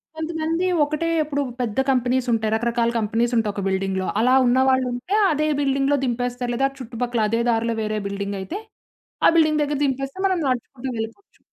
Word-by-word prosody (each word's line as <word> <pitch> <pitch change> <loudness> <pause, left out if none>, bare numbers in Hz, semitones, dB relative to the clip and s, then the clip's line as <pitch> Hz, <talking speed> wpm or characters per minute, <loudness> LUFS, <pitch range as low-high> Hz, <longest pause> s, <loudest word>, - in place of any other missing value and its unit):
కొంతమంది 320 +2 -2 0.2
ఒకటే, 305 +3 -1 0.2
ఇప్పుడు 285 -1 -2 0.2
పెద్ద 225 0 -2
కంపెనీస్ 255 0 +1
ఉంటాయి. 220 -1 0
రకరకాల 235 +1 +1
కంపెనీస్ 230 +3 0
ఉంటాయి 215 -2 +1
ఒక 200 - -4
బిల్డింగ్‌లో 190 0 -1
అలా 250 +3 +4
ఉన్న 245 +2 +3
వాళ్ళు 260 -1 +3
ఉంటే 255 +12 -2 0.2
అదే 305 0 +1
బిల్డింగ్‌లో 275 0 +2
దింపేస్తారు. 245 0 -2
లేదా 270 +3 +2
చుట్టుపక్కల 240 -1 -2
అదే 230 +2 +1
దారిలో 230 0 +1
వేరే 215 0 -2
బిల్డింగ్ 200 0 -4
అయితే 340 - -5 0.7
ఆ - - +8
బిల్డింగ్ 305 -1 +3
దగ్గర 290 0 -1
దింపేస్తే 270 +3 -3
మనం 375 -2 +2
నడుచుకుంటూ 255 +1 -3
వెళ్ళిపోవచ్చు. 225 - -7
245 Hz, 165 wpm, -22 LUFS, 225-285 Hz, 0.7 s, ఆ